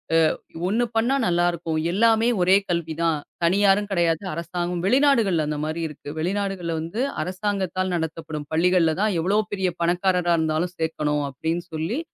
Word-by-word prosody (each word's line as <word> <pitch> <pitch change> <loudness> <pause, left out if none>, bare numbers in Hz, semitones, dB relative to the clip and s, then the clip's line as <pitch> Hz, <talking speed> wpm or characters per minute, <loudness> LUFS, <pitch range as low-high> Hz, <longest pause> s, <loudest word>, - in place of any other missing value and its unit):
அ, - - +6 0.5
1 225 +5 +1
பண்ணா 235 +4 +2
நல்லா 175 0 +2
இருக்கும். 165 -1 -4 0.2
எல்லாமே 225 +3 +3
ஒரே 185 +2 +5
கல்வி 170 -2 -1
தான். 165 -2 +1 0.2
தனியாரும் 200 +3 +3
கிடையாது. 170 -2 +1
அரசாங்கம் 175 +2 -3
வெளிநாடுகள்ல 230 - +3
அந்த 150 0 -2
மாரி 155 +2 -3
இருக்கு. 150 -1 -10
வெளிநாடுகள்ல 190 -1 -2
வந்து 170 +9 -4 0.2
அரசாங்கத்தால் 185 0 -2
நடத்தப்படும் 160 -2 -4
பள்ளிகள்ல 170 0 +3
தான் 210 -3 +1
எவ்வளவு 200 +6 +2
பெரிய 190 -2 0
பணக்காரரா 180 0 +2
இருந்தாலும் 160 +2 0
சேர்க்கணும் 150 -2 -1
அப்படின்னு 160 +6 -3
சொல்லி, 160 - -2
175 Hz, 145 wpm, -23 LUFS, 160-195 Hz, 0.5 s, அ